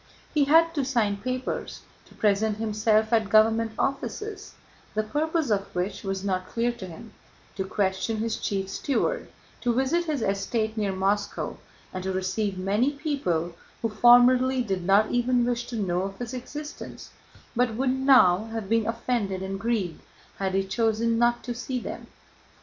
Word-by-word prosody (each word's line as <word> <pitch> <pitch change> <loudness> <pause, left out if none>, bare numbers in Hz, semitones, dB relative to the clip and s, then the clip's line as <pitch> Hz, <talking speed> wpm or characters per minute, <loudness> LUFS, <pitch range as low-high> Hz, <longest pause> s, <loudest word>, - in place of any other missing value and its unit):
He 295 -2 +3
had 330 +3 +5
to 290 -4 0
sign 230 -6 +1
papers, 255 +4 -4 0.2
to - - -19
present 210 0 +1
himself 220 0 +1
at 220 -3 +3
government 225 +1 +4
offices, 410 +9 -3 0.4
the 215 - +1
purpose 305 +4 -1
of 200 -1 +1
which 180 +3 -2
was 195 -1 -3
not 185 -2 -1
clear 235 +3 0
to 220 -6 -8
him, 205 +6 -11 0.4
to 190 - -2
question 195 +3 -1
his 225 0 -1
chief 195 -1 -2
steward, 280 - -1 0.3
to 240 -2 +1
visit 280 +7 +1
his 300 -7 -1
estate 215 +3 -1
near 205 -3 0
Moscow, 195 +2 -1 0.4
and 185 -1 -4
to 190 - -2
receive 190 +2 -1
many 205 +9 +1
people 230 - -1 0.3
who 225 - +1
formerly 250 +3 +5
did 190 -5 -2
not 200 +3 +4
even 245 0 +2
wish 240 0 -1
to 245 - -6
know 180 -5 0
of 195 +1 -5
his 245 0 -6
existence 295 +4 -8 0.4
but 240 -2 +1
would 255 +2 +1
now 255 -8 +5
have 225 -2 -5
been 225 +1 +1
offended 230 -5 -1
and 195 0 -4
grieved 210 -7 -1 0.4
had 190 -1 -1
he 195 - +2
chosen 225 +3 +1
not 240 0 +2
to 245 - -3
see 250 +2 -3
them. - - -7
225 Hz, 165 wpm, -26 LUFS, 195-250 Hz, 0.4 s, had